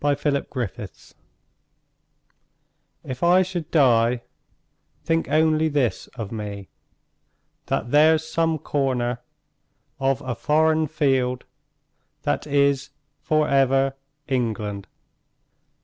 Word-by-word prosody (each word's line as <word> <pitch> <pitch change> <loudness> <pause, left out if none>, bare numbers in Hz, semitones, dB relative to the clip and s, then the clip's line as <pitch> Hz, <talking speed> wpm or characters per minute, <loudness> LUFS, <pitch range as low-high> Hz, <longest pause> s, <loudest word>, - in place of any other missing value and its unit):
V. 145 -1 +3
The 145 -1 -1
Soldier 120 -8 -4 2.1
If 130 -1 -7
I 180 +2 +5
should 175 -4 -5
die, 120 -5 +3 0.8
think 165 -2 0
only 155 +1 +3
this 140 -6 -1
of 110 -4 -6
me: 105 -3 -6 1.0
That 120 - -2
there's 155 +2 +4
some 165 0 0
corner 130 -5 -1 0.8
of 135 0 0
a 130 -3 -3
foreign 155 +5 +2
field 135 -4 0 0.8
That 75 - -1
is 140 -1 +2 0.3
for 155 -1 +1
ever 135 0 +2 0.3
England. 110 -6 -2
140 Hz, 95 wpm, -23 LUFS, 125-155 Hz, 2.1 s, I